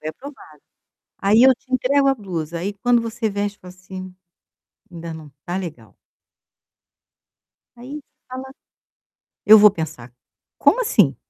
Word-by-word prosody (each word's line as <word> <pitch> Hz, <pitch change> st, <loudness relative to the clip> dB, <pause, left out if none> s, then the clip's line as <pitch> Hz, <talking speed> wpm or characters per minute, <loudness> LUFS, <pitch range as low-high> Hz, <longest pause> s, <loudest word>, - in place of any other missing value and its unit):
Foi 155 Hz, -, -4 dB
aprovada. 280 Hz, -, -12 dB, 0.7 s
Aí 210 Hz, +4 st, +4 dB
eu 265 Hz, 0 st, +7 dB
te 260 Hz, +2 st, -20 dB
entrego 275 Hz, +2 st, +2 dB
a 270 Hz, -, +3 dB
blusa, 170 Hz, -, -5 dB, 0.2 s
quando 245 Hz, 0 st, +3 dB
você 230 Hz, 0 st, -2 dB
veste 205 Hz, 0 st, -3 dB
e -, -, -44 dB
fala 180 Hz, 0 st, -12 dB
assim: 185 Hz, 0 st, -10 dB, 0.8 s
"Ainda 170 Hz, -1 st, -7 dB
não 160 Hz, -1 st, -10 dB
está 145 Hz, +5 st, -8 dB
legal" 145 Hz, -, -8 dB, 1.8 s
aí 270 Hz, +5 st, -9 dB, 0.3 s
fala: 260 Hz, +1 st, -7 dB, 1.0 s
"Eu 220 Hz, -, +10 dB
vou 210 Hz, 0 st, +8 dB
pensar". 160 Hz, -9 st, -6 dB, 0.5 s
Como -, -, +4 dB
assim? 465 Hz, -, +3 dB
205 Hz, 135 wpm, -21 LUFS, 170-250 Hz, 1.8 s, Eu